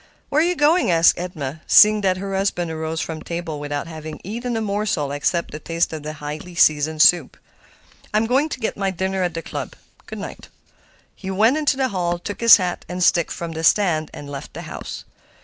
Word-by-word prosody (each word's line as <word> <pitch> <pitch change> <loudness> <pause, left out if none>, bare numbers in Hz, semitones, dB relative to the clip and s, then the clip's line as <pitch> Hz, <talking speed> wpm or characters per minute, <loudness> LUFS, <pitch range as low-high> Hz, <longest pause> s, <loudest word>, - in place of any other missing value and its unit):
"Where 300 - +3
are - - +4
you 355 +1 +1
going?" 305 - +3
asked 165 -1 +4
Edna, 155 -4 -5
seeing 210 0 +7
that 185 -2 +1
her 195 +1 -5
husband 180 -3 -1
arose 160 +1 -3
from 160 -2 -5
table 170 -3 -5
without 145 0 -4
having 155 -1 -8
eaten 235 +4 -4
a - - 0
morsel 200 -9 -1
except 145 +4 -1
a 150 - -6
taste 165 +1 -1
of 155 - -5
the 155 +1 -6
highly 150 +4 -7
seasoned 155 -1 +3
soup. 175 -6 +3 0.7
"I'm 215 +1 +2
going 270 +7 +1
to 260 - -5
get 220 - -2
my 195 -1 -1
dinner 190 +1 -2
at 175 -2 -1
the 165 - -4
club. - - -6 0.3
Good - - -7
night." - - -8 0.7
He 190 - -8
went 220 +8 +3
into 295 -3 +1
the 265 -1 +1
hall, 175 -3 -1
took 205 +5 -7
his 230 -1 +9
hat 180 -3 -3
and 180 0 -2
stick 170 -1 +3
from 170 -1 -5
the 160 0 -5
stand, 165 -5 +2
and 145 - -9
left 140 -1 -8
the - - -6
house. - - -8
175 Hz, 210 wpm, -21 LUFS, 155-205 Hz, 0.7 s, his